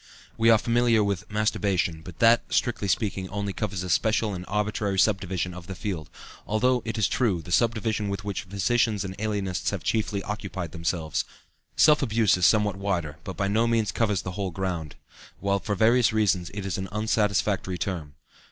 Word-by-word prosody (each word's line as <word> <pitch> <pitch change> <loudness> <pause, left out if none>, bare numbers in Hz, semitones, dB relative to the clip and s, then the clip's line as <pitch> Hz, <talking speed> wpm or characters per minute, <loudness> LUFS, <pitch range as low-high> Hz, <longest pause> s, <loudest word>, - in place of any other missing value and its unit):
We 115 0 +3
are 115 - +7
familiar 115 -1 +2
with 100 -1 -2
"masturbation," 100 -6 0
but 85 0 -11
that, 115 +3 +4
strictly 120 -5 0
speaking, 95 -1 -1
only 100 0 -3
covers 100 -4 -3
a 90 - -5
special 110 +4 +2
and 90 -1 -6
arbitrary 105 -1 -1
subdivision 95 -3 +1
of 90 -1 -10
the 95 - -6
field, 90 -7 -4 0.4
although, 125 +4 +2
it 115 -1 -3
is 105 -4 +3
true, 95 -9 0
the 90 - -10
subdivision 110 -1 +1
with 100 +1 -4
which 100 -1 -4
physicians 100 +2 +1
and 95 0 -6
alienists 100 -4 -1
have 100 -5 -4
chiefly 105 -3 -1
occupied 95 -5 -5
themselves. 85 -1 -2 0.5
"Self 150 -1 +5
abuse" 115 -5 +3
is 90 -1 +4
somewhat 105 -1 +2
wider, 85 -6 -2
but 95 - -7
by 100 - 0
no 110 +4 +2
means 115 -3 +1
covers 105 -2 0
the 90 - -4
whole 95 0 -3
ground, 85 -5 -4 0.4
while 100 0 +1
for 105 +1 -2
various 115 +4 +4
reasons 100 -5 +1
it 100 -2 -4
is 95 -1 -2
an 95 0 -5
unsatisfactory 105 -3 0
term. 80 -7 -4
100 Hz, 180 wpm, -26 LUFS, 95-110 Hz, 0.5 s, are